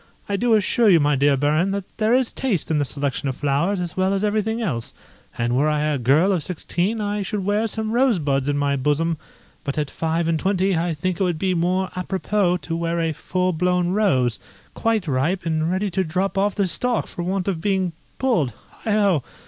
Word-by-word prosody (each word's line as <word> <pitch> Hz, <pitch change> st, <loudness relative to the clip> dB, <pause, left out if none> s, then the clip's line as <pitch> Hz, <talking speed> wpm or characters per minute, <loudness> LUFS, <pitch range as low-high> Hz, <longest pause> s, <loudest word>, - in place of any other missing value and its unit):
I 200 Hz, -, -1 dB
do 230 Hz, +2 st, +3 dB
assure 215 Hz, +2 st, +3 dB
you, 175 Hz, -4 st, +6 dB
my 145 Hz, -1 st, +2 dB
dear 140 Hz, +1 st, +3 dB
Baron, 155 Hz, +6 st, +2 dB
that 200 Hz, 0 st, -2 dB
there 220 Hz, +2 st, +3 dB
is 255 Hz, -2 st, +1 dB
taste 205 Hz, -, -1 dB
in 155 Hz, -, +2 dB
the 145 Hz, -, +1 dB
selection 140 Hz, 0 st, -2 dB
of 130 Hz, -, -3 dB
flowers 145 Hz, +7 st, 0 dB
as 175 Hz, -2 st, -4 dB
well 190 Hz, +1 st, +1 dB
as 195 Hz, -, -1 dB
everything 215 Hz, +2 st, 0 dB
else, 140 Hz, -, -3 dB, 0.4 s
and 120 Hz, +1 st, 0 dB
were 145 Hz, +4 st, +3 dB
I 150 Hz, -1 st, +1 dB
a 150 Hz, -2 st, 0 dB
girl 145 Hz, +11 st, +3 dB
of 175 Hz, -6 st, 0 dB
sixteen 180 Hz, +4 st, -2 dB
I 205 Hz, 0 st, -1 dB
should 200 Hz, 0 st, -3 dB
wear 210 Hz, +3 st, +1 dB
some 220 Hz, 0 st, -3 dB
rosebuds 160 Hz, -, +2 dB
in 145 Hz, -, 0 dB
my 140 Hz, -1 st, +1 dB
bosom, 150 Hz, +4 st, 0 dB, 0.5 s
but 140 Hz, +1 st, -3 dB
at 150 Hz, -2 st, -1 dB
five 165 Hz, +1 st, -1 dB
and 165 Hz, -1 st, +1 dB
twenty 190 Hz, 0 st, +1 dB
I 165 Hz, 0 st, 0 dB
think 180 Hz, +3 st, -2 dB
it -, -, +2 dB
would 175 Hz, -3 st, 0 dB
be 185 Hz, +3 st, 0 dB
more 180 Hz, +2 st, 0 dB
apropos 185 Hz, 0 st, 0 dB
to 165 Hz, -, -3 dB
wear 170 Hz, 0 st, -1 dB
a 165 Hz, -1 st, 0 dB
full 185 Hz, +4 st, -1 dB
blown 180 Hz, +1 st, +1 dB
rose, 135 Hz, -, +2 dB, 0.3 s
quite 225 Hz, -5 st, 0 dB
ripe, 155 Hz, +7 st, 0 dB
and 160 Hz, 0 st, 0 dB
ready 190 Hz, +2 st, -1 dB
to 190 Hz, +2 st, +1 dB
drop 185 Hz, +4 st, -1 dB
off 200 Hz, +1 st, +1 dB
the 200 Hz, -3 st, +1 dB
stalk 240 Hz, +7 st, -1 dB
for 175 Hz, -, -7 dB
want 185 Hz, +2 st, -2 dB
of 180 Hz, -5 st, -1 dB
being 190 Hz, -2 st, 0 dB, 0.3 s
pulled 195 Hz, -, +1 dB, 0.3 s
heigh 215 Hz, -, +1 dB
ho!" 200 Hz, -9 st, +3 dB
180 Hz, 215 wpm, -22 LUFS, 150-200 Hz, 0.5 s, you